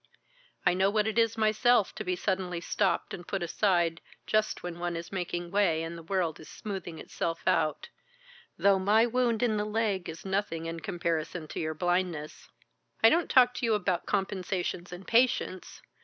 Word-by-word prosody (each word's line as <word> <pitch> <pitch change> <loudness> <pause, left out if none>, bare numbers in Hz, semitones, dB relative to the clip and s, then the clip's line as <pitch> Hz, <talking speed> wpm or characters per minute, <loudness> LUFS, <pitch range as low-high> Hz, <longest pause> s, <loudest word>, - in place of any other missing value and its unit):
"I 180 - +5
know 190 +2 +3
what 210 0 +1
it 220 +1 +1
is 230 0 +2
myself 220 0 +3
to - - -5
be 180 0 -1
suddenly 185 -2 -2
stopped 190 +3 0
and 175 - -8
put 195 -3 -2
aside 175 -2 +1 0.2
just 215 0 0
when 175 -1 -6
one 175 0 -2
is 170 +1 -6
making 175 -2 -3
way 180 -5 +2
and 165 +1 -5
the 165 - -8
world 170 -2 -1
is 155 - -12
smoothing 190 -5 -6
itself 165 +1 -4
out, 155 -2 +1 0.7
though 200 -1 +4
my 210 +4 +4
wound 240 -1 +1
in 220 -3 +2
the 210 - 0
leg 210 -4 -1
is 160 +3 -8
nothing 190 -4 -2
in 165 0 -4
comparison 170 -2 -3
to - - -5
your 155 0 -2
blindness. 175 -2 -2 0.5
I 225 - +8
don't 340 0 +2
talk 250 -2 +6
to - - -6
you 225 -2 +3
about 185 -4 -1
compensations 190 -2 -2
and 180 +2 -8
patience. 230 -6 +1
185 Hz, 180 wpm, -29 LUFS, 170-215 Hz, 0.7 s, I